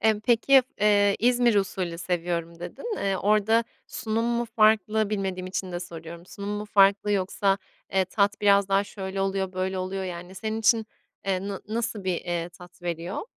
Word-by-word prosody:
Emm, 220 -1 +2
peki, 250 +4 +5 0.2
eee, 205 -1 +4
İzmir 240 0 +3
usulü 185 -4 -1
seviyorum 170 -2 -2
dedin. 425 - -5
Eee, 195 -1 0
orada 215 +3 +3 0.2
sunum 225 0 -2
mu 235 0 0
farklı 215 0 +3
bilmediğim 190 -3 -2
için 185 0 -4
de 175 - -3
soruyorum. 170 0 -9
Sunum 200 +1 -7
mu 210 0 -3
farklı 200 0 +4
yoksa, 195 +1 +1 0.3
eee, 190 -1 +3
tat 200 +2 0
biraz 200 -1 +4
daha 195 +1 +3
şöyle 195 -1 -5
oluyor, 195 -1 -1
böyle 185 0 -2
oluyor, 190 +1 -3
yani, 180 0 -7
senin 220 +2 -3
için, 225 0 +3 0.4
eee, 195 0 -1
na 195 -1 -5
nasıl 225 -2 -3
bir, 185 -2 0
eee, 175 -1 -3
tat 175 0 -16
veriyor? 170 +2 -3
195 Hz, 170 wpm, -26 LUFS, 185-215 Hz, 0.4 s, peki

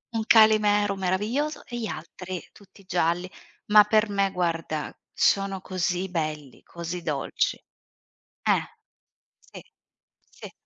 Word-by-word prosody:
un 220 - 0
calimero 210 -2 +5
meraviglioso 210 +11 -1
e 240 - -6
gli 220 - -3
altri 185 -2 -7
tutti 200 0 -19
gialli. 175 0 0 0.4
Ma 210 0 +8
per 215 +1 +2
me 200 -1 +1
guarda, 165 -3 -2 0.2
sono 195 -1 +2
così 185 0 -2
belli, 155 -5 -4
così 170 +1 -6
dolci. 145 -4 -1 0.8
Eh. - - +2 0.7
Sì. - - -13 0.7
Sì. - - -11
190 Hz, 115 wpm, -26 LUFS, 175-210 Hz, 0.8 s, Ma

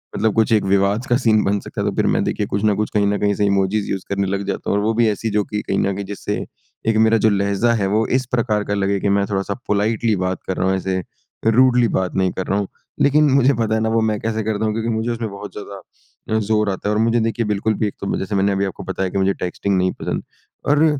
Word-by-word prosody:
मतलब 110 0 +1
कुछ 110 0 +2
एक 110 - +3
विवाद 100 +4 +2
का 120 - +2
सीन 110 -5 +3
बन 100 +1 +1
सकता - - -6
है - - -1
तो - - -6
फिर - - +1
मैं - - +2
देखिए 105 - -1
कुछ 100 0 -2
ना 105 -1 +4
कुछ 105 +1 -1
कहीं 105 -1 +2
न 100 0 +1
कहीं 100 0 +2
से 105 - +1
इमोजिस 100 +1 +1
यूज़ 95 -1 -3
करने 100 0 0
लग 100 +1 -2
जाता 100 - -3
हूँ 100 - +2
और 100 - 0
वो 110 +1 +1
भी 115 - +5
ऐसी 110 +2 -2
जो 105 0 +1
कि 105 0 -3
कहीं 95 - -2
न 100 - +1
कहीं 100 +1 -4
जिससे 100 +1 -4 0.5
एक 110 - +2
मेरा 115 0 +4
जो - - +6
लहज़ा 100 +3 +1
है 95 - +1
वो 110 +1 +2
इस 130 - -7
प्रकार 110 -4 +1
का - - +1
लगे 100 0 0
कि 100 - 0
मैं 100 - +1
थोड़ा-सा 100 0 -1
पोलाइटली 110 +2 +1
बात 95 0 -2
कर 95 - -2
रहा 95 - +1
हूँ 95 - +2
ऐसे 95 0 -1 0.5
रूडली 125 +1 +5
बात 95 -1 -2
नहीं 95 -1 +2
कर 95 - -3
रहा 100 - +1
हूँ। 100 - -2 0.3
लेकिन 150 +1 +4
मुझे 135 0 +4
पता 110 -3 0
है 110 - 0
ना 110 - +1
वो 115 0 +2
मैं 110 -1 0
कैसे 110 0 -2
करता 110 0 -1
हूँ 110 - 0
क्योंकि 115 +1 -2
मुझे 110 +1 -1
उसमें 115 -1 -3
बहुत 100 +1 -8
ज़्यादा 100 +2 -6
ज़ोर 105 -1 +2
आता 100 +1 -2
है 105 - +1
और 110 - +2
मुझे 115 +1 +2
देखिए 115 +1 -1
बिल्कुल 105 +1 0
भी - - +2
एक 100 - -6
तो 100 - -1
जैसे 100 +2 -3
मैंने 100 +1 +2
अभी 100 0 0
आपको 95 - -6
बताया 95 0 -2
कि 100 - -4
मुझे 95 0 +2
टेक्स्टिंग 95 +2 -1
नहीं 90 0 +2
पसंद - - -2 0.5
और 150 +2 +4
105 Hz, 275 wpm, -20 LUFS, 100-110 Hz, 0.5 s, जो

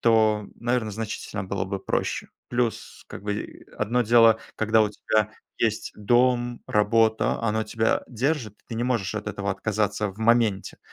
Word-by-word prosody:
то, 110 -3 +3
наверное, 120 -3 -1
значительно 105 -1 -4
было 100 +1 -2
бы 100 0 -3
проще. - - -2 0.2
Плюс, 120 -3 -2
как - - -9
бы, 105 0 -5
одно 120 +4 +1
дело, 115 -1 +6 0.2
когда 110 0 +3
у 105 - +3
тебя 105 +1 0 0.3
есть 110 -2 0
дом, 120 +2 +2
работа, 110 +1 +2
оно 110 -1 +1
тебя 110 +1 0
держит, 125 -2 -1
ты 115 - -5
не 120 +2 -1
можешь 115 -6 -1
от 105 -1 -4
этого 100 0 -2
отказаться 105 +1 -1
в 95 +3 -11
моменте. 110 -3 +2
110 Hz, 155 wpm, -25 LUFS, 105-120 Hz, 0.3 s, дело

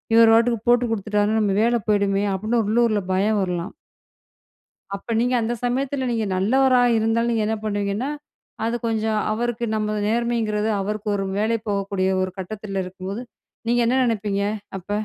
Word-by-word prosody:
இவரு 230 0 +7
பாட்டுக்கு 235 0 +3
போட்டு 245 0 +4
கொடுத்துட்டார்ன்னா, 210 0 +1
நம்ம 200 -2 +1
வேல 240 +1 +3
போயிடுமே" 200 -1 +2
அப்டின்னு 220 +5 0
உள்ளூர்ல 220 0 +2
பயம் 205 +3 +2
வரலாம். 180 -1 -3 1.2
அப்ப 200 +4 -4
நீங்க 250 +2 +1
அந்த 225 +1 -1
சமயத்துல 265 +2 -1
நீங்க 225 -2 0
நல்லவரா 255 +6 +3 0.2
இருந்தாலும் 225 +2 +1
நீங்க 225 -2 +1
என்ன 220 +1 0
பண்ணுவீங்கன்னா, 205 +4 -1 0.5
அது 230 +1 0
கொஞ்சம் 220 -1 0
அவருக்கு 235 +1 -2
நம்ம 215 0 -1
நேர்மைங்கிறது 225 -2 0
அவருக்கு 210 +2 -3
ஒரு 195 - -2
வேலை 220 +2 +1
போகக்கூடிய 195 -1 0
ஒரு 185 - -2
கட்டத்துல 195 0 -4
இருக்கும்போது, 190 +4 -6 0.5
நீங்க 240 +1 +3
என்ன 255 +3 +2
நினைப்பீங்க? 210 -4 -1 0.4
அப்ப 190 +2 -14
215 Hz, 150 wpm, -22 LUFS, 200-235 Hz, 1.2 s, இவரு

